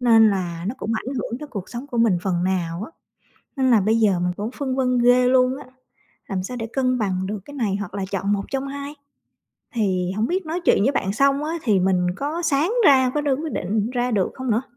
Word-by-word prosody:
Nên 225 -3 +6
là 175 -3 -3
nó 225 - -3
cũng 225 - -3
ảnh 255 +5 -4
hưởng 240 -1 -3
tới 300 - -6
cuộc 200 -8 -6
sống 245 +3 -6
của 245 -4 -4
mình 220 -6 +3
phần 180 -2 0
nào 180 0 -1
á. 245 - -11 0.7
Nên 260 -1 +3
là 225 -4 +5
bây 215 +4 +2
giờ 200 -5 +3
mình 180 0 0
cũng 210 +3 -3
phân 260 -1 -3
vân 255 -1 +1
ghê 245 +1 +5
luôn 255 +1 +3
á, 285 - -10 0.6
làm 185 -2 -2
sao 250 +6 -5
để 225 -1 -4
cân 255 -2 +1
bằng 190 -3 -1
được 210 +1 -4
cái 285 - -11
này 220 -8 0
hoặc 205 -3 -6
là 195 -1 -2
chọn 200 +1 0
một 200 -1 -1
trong 270 0 -2
hai? 280 +1 -6 0.8
Thì 185 -5 0
hổng 215 +2 +1
biết 370 -1 -1
nói 330 +3 -2
chuyện 200 - +4
với 265 +6 +3
bạn 195 -7 -1
xong 275 +5 +2
á 315 - -2
thì 210 -6 +2
mình 180 -1 +2
có 300 +7 -3
sáng 320 +4 +1
ra, 260 -2 +6
có 300 - +1
đưa 285 -2 +1
quyết 310 +2 -5
định 210 +4 -1
ra 250 0 -1
được 200 -5 0
hông 260 -2 -3
nữa? 225 +4 +1
235 Hz, 250 wpm, -22 LUFS, 195-270 Hz, 0.8 s, Nên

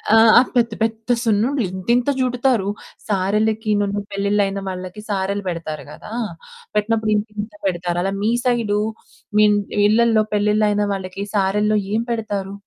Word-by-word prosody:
ఆ! - - +7 0.4
పెద్ద 235 -2 +3
పెద్ద 225 +2 0
సున్నుండ్లు 230 +4 +1
ఇంతింత 235 +8 0
చుడతారు. 250 -4 +1 0.4
సారెలకినను 205 +1 0
పెళ్ళిళ్ళైన 200 0 0
వాళ్ళకి 185 +2 -6
సారెలు 200 0 -1
పెడతారు 165 -3 -5
కదా! 215 - -11 0.6
పెట్టినప్పుడు 220 0 +1
ఇంతింత 210 0 -4
పెడతారు. 175 -1 -1
అలా 195 0 -1
మీ 220 +2 +2
సైడు 225 -4 +1 0.6
మీ 215 - +7 0.4
ఇళ్ళల్లో 225 0 +4
పెళ్ళిళ్ళు 210 +1 +2
అయిన 205 0 +1
వాళ్ళకి 190 +1 -5
సారెల్లో 210 +2 +2 0.2
ఏం 225 +1 +1
పెడతారు? 200 -4 -3
210 Hz, 125 wpm, -20 LUFS, 195-225 Hz, 0.6 s, ఆ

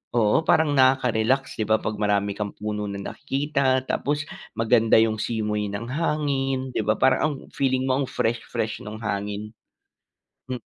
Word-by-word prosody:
oo, 115 +6 +3
parang 150 -2 +3
nakaka-relax 130 -1 +2
'di 110 - 0
ba? 110 0 +4
'Pag 110 - -3
marami 100 -1 +1
kang 105 -1 -3
puno 105 0 -3
na 100 - -5
nakikita, 140 0 0
tapos 145 +1 -1 0.4
maganda 115 -1 +4
yung 110 -1 +1
simoy 105 -2 -1
ng 105 +4 -5
hangin, 135 -3 0
'di - - +1
ba, 110 - +3
parang 130 0 +4
ang 155 -2 0 0.2
feeling 130 -1 +1
mo 130 +2 +2
ang - - -4
fresh-fresh 115 -1 -2
no'ng 105 +1 -7
hangin. 105 0 -3 1.0
Hmm. 125 -1 -4
115 Hz, 155 wpm, -24 LUFS, 105-135 Hz, 1.0 s, ba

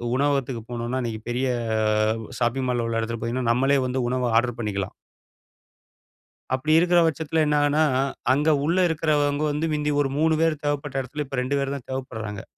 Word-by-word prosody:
உணவகத்துக்கு 135 -3 0
போனோம்னா, 120 +2 -2
அன்னைக்கு 115 -3 -4
பெரிய 125 +2 0 0.8
உ - - -10
ஷாப்பிங் 125 +2 0
மால்ல 120 -2 0
உள்ள 115 0 -1
இடத்துக்கு 115 +1 -3
போனீங்கன்னா 120 0 0
நம்மளே 135 +3 +3
வந்து 130 +1 -1
உணவ 125 -1 0
ஆர்டர் 120 0 +1
பண்ணிக்கலாம். 100 -4 -3 1.6
அப்படி 130 +4 0
இருக்குற 175 +1 +4
பட்சத்தில 160 +1 0
என்ன 150 0 +2
ஆகும்ன்னா, 145 +2 +3 0.5
அங்க 145 +4 +1 0.2
உள்ள 170 +5 +1
இருக்கறவங்க 150 -3 +1
வந்து, 155 +3 -1
மிந்தி 150 0 0
ஒரு 135 - -2
3 160 +1 +3
பேரு 165 -1 +2
தேவைப்பட்ட 145 -2 -1
எடத்துல, 150 +4 -5
இப்ப 135 -1 -5
2 135 +3 -1
பேரு 140 0 -2
தான் 130 - -11
தேவைப்படுறாங்க. 110 -6 -5
135 Hz, 165 wpm, -24 LUFS, 120-150 Hz, 1.6 s, இருக்குற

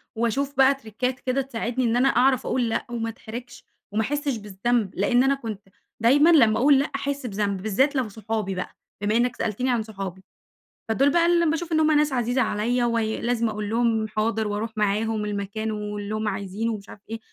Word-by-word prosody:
وأشوف 270 +5 -1
بقى 270 +1 +6
تِرِكات 250 +1 -3
كده 260 +1 0
تساعدني 245 -1 -2
إن 230 +1 +1
أنا 265 +2 +4
أعرف 260 +1 +3
أقُول 245 -3 0
لأ 225 - -1
وما 230 -1 -3
أتحرجش، 235 +2 -9 0.3
وما 215 +2 +1
أحسش 285 0 -1
بالذنب، 210 +1 -1
لإن 245 +6 +3
أنا 275 +1 +3
كنت 215 -6 -7 0.3
دايمًا 285 +8 +5
لمّا 230 -10 +5
أقُول 275 +1 +5
لأ 280 - +1
أحس 280 -1 -3
بذنب، 200 -3 -2
بالذات 260 +8 +1
لو 250 -5 0
صحابي 215 -2 -3
بقى 180 - -5 0.3
بما 210 +2 +1
إنك 245 0 +1
سألتني 245 +5 -1
عن 230 -3 +1
صحابي 190 -3 -7 0.7
فدول 270 +6 +3
بقى 340 +1 +3
ال 340 -2 +3
باشوف 330 +1 -3
إن 315 - +3
هُم 310 0 +4
ناس 300 -2 +3
عزيزة 245 +1 +1
عليّا، 240 +4 0
وي 225 -2 0
لازم 235 -1 0
أقُول 210 -1 -4
لهم 225 -1 +1
حاضر 220 0 -1
وأروح 210 +2 -3
معاهم 210 +1 0
المكان 210 +2 -3
واللي 210 0 -4
هُم 215 0 -2
عايزينه 205 +3 -2
ومش 205 -1 -8
عارف 205 - -12
إيه، 225 0 -4
230 Hz, 195 wpm, -24 LUFS, 210-260 Hz, 0.7 s, بقى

